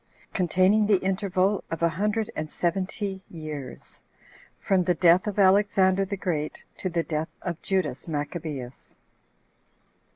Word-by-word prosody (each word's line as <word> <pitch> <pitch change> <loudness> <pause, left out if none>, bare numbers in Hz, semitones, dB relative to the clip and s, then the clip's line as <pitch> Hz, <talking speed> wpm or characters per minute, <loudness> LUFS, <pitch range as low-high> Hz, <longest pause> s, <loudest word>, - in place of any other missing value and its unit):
Containing 185 +3 +3
The 205 -2 +5
Interval 190 +1 0
Of 165 0 -3
A 170 - +5
Hundred 210 +6 -1
And 155 0 -3
Seventy 190 +3 -2
Years.From 155 +4 -5
The 180 - +2
Death 175 +3 +4
Of 210 - -3
Alexander 195 -1 +4
The 200 +1 -4
Great 155 -5 -3
To 185 - -2
The 170 -1 0
Death 155 0 -2
Of 175 -2 -4
Judas 185 -9 -1
Maccabeus. 145 -4 -5
185 Hz, 125 wpm, -26 LUFS, 160-195 Hz, -, The